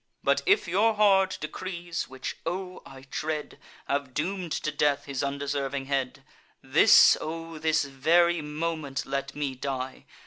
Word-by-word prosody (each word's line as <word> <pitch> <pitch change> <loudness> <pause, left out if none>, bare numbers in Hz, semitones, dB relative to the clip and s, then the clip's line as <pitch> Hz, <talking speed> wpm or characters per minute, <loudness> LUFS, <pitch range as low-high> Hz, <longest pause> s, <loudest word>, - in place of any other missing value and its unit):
But - - +2
if 400 - +4
your 210 +6 +2
hard 195 -2 +4
decrees—which, 170 -4 -5
O! 185 +1 -4
I 135 -1 -12
dread— 155 -1 -4 0.3
Have 140 -2 -2
doom'd 180 +2 -2
to 155 - -2
death 145 -1 +1
his 140 -3 -3
undeserving 140 -1 -2
head; 135 -2 -2 0.4
This, - - +7
O 165 0 -6
this 160 0 +2
very 165 +5 +2
moment, 150 -2 -3
let 140 +1 -3
me 145 -2 -2
die! 130 0 -5
150 Hz, 135 wpm, -27 LUFS, 140-170 Hz, 0.4 s, This